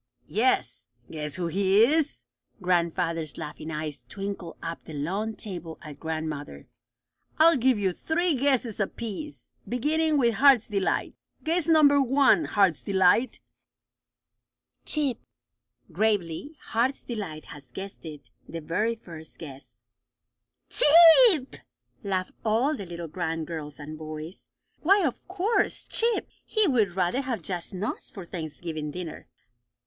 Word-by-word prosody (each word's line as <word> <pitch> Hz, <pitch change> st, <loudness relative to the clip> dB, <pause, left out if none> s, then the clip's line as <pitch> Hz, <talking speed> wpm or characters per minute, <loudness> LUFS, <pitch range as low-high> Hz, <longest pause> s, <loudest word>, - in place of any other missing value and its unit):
"Yes. 240 Hz, +5 st, 0 dB, 0.2 s
Guess 150 Hz, -2 st, -5 dB
who 180 Hz, -, -2 dB
he 195 Hz, +4 st, +3 dB
is?" 300 Hz, +4 st, +1 dB, 0.3 s
Grandfather's 170 Hz, -3 st, 0 dB
laughing 155 Hz, +1 st, -7 dB
eyes 155 Hz, -2 st, -5 dB
twinkled 195 Hz, -4 st, -6 dB
up 165 Hz, 0 st, -5 dB
the 160 Hz, -, -8 dB
long 195 Hz, +10 st, -2 dB
table 175 Hz, -6 st, -7 dB
at 150 Hz, -3 st, -10 dB
grandmother. 155 Hz, -, -5 dB, 0.7 s
"I'll 330 Hz, +2 st, +6 dB
give 255 Hz, -2 st, +3 dB
you 195 Hz, -2 st, +1 dB
three 335 Hz, -, 0 dB
guesses 260 Hz, -5 st, 0 dB
apiece, 230 Hz, +8 st, -5 dB, 0.2 s
beginning 305 Hz, +5 st, +1 dB
with 235 Hz, -4 st, +3 dB
Heart's 270 Hz, -3 st, +5 dB
Delight. 200 Hz, -4 st, -1 dB, 0.3 s
Guess 330 Hz, +1 st, +1 dB
number 295 Hz, -3 st, +6 dB
one, 275 Hz, +4 st, +4 dB
Heart's 195 Hz, -7 st, +2 dB
Delight." 200 Hz, +5 st, +2 dB, 1.4 s
"Chip," 285 Hz, -6 st, 0 dB, 0.7 s
gravely. 215 Hz, -, -1 dB
Heart's 250 Hz, +4 st, -1 dB
Delight 195 Hz, -, -6 dB
had 145 Hz, -2 st, -11 dB
guessed 195 Hz, 0 st, -8 dB
it 150 Hz, -7 st, -10 dB, 0.2 s
the 165 Hz, -, -5 dB
very 210 Hz, +9 st, -1 dB
first 160 Hz, -7 st, -12 dB
guess. 140 Hz, -3 st, -12 dB, 0.9 s
"Chip!" 335 Hz, -, +7 dB, 0.5 s
laughed 190 Hz, -2 st, -2 dB
all 235 Hz, +8 st, +2 dB
the 200 Hz, -8 st, -7 dB
little 170 Hz, -1 st, -6 dB
grand 160 Hz, +1 st, -3 dB
girls 150 Hz, -3 st, -7 dB
and 155 Hz, +1 st, -8 dB
boys. 155 Hz, +3 st, -8 dB, 0.3 s
Why, 390 Hz, +3 st, +4 dB
of 265 Hz, -, -3 dB
course! 400 Hz, +3 st, 0 dB
Chip! 460 Hz, 0 st, +2 dB, 0.2 s
He 435 Hz, -2 st, +1 dB
would 220 Hz, -, +2 dB
rather 190 Hz, +8 st, +1 dB
have 245 Hz, -9 st, -4 dB
just 175 Hz, 0 st, -5 dB
nuts 195 Hz, +3 st, -4 dB
for 190 Hz, -4 st, -9 dB
Thanksgiving 160 Hz, -2 st, -5 dB
dinner! 170 Hz, +1 st, -7 dB
200 Hz, 125 wpm, -26 LUFS, 165-270 Hz, 1.4 s, Chip